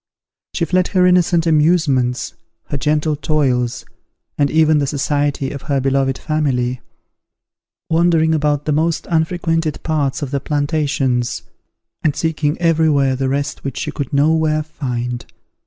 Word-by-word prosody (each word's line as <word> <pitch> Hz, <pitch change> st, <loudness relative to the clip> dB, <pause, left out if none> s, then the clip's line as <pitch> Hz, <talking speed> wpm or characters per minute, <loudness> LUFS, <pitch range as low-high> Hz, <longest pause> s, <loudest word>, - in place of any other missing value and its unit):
She 170 Hz, -, +1 dB
fled 185 Hz, +1 st, +1 dB
her 185 Hz, -2 st, +2 dB
innocent 175 Hz, -2 st, +3 dB
amusements, 150 Hz, -6 st, +2 dB, 0.4 s
her 145 Hz, -, -2 dB
gentle 150 Hz, +2 st, +1 dB
toils, 135 Hz, -6 st, 0 dB, 0.5 s
and 145 Hz, -1 st, +1 dB
even 155 Hz, 0 st, +3 dB
the 140 Hz, -, 0 dB
society 145 Hz, -1 st, -1 dB
of 140 Hz, -, -6 dB
her 140 Hz, -1 st, +2 dB
beloved 135 Hz, 0 st, +1 dB
family; 130 Hz, -5 st, -1 dB, 1.1 s
wandering 165 Hz, -1 st, +3 dB
about 150 Hz, -2 st, 0 dB
the 155 Hz, -, 0 dB
most 160 Hz, +2 st, 0 dB
unfrequented 165 Hz, -1 st, 0 dB
parts 150 Hz, -3 st, -1 dB
of 135 Hz, -, -4 dB
the 140 Hz, -, 0 dB
plantations, 145 Hz, -4 st, -1 dB, 0.6 s
and 150 Hz, -3 st, +1 dB
seeking 160 Hz, -1 st, -1 dB
every 165 Hz, -2 st, +2 dB
where 140 Hz, -3 st, +2 dB
the 130 Hz, 0 st, -1 dB
rest 140 Hz, +2 st, -2 dB
which 135 Hz, -2 st, -5 dB
she -, -, -3 dB
could 140 Hz, -3 st, -5 dB
no 145 Hz, +3 st, +3 dB
where 155 Hz, -1 st, +1 dB
find. 125 Hz, -5 st, -4 dB
150 Hz, 140 wpm, -18 LUFS, 135-160 Hz, 1.1 s, innocent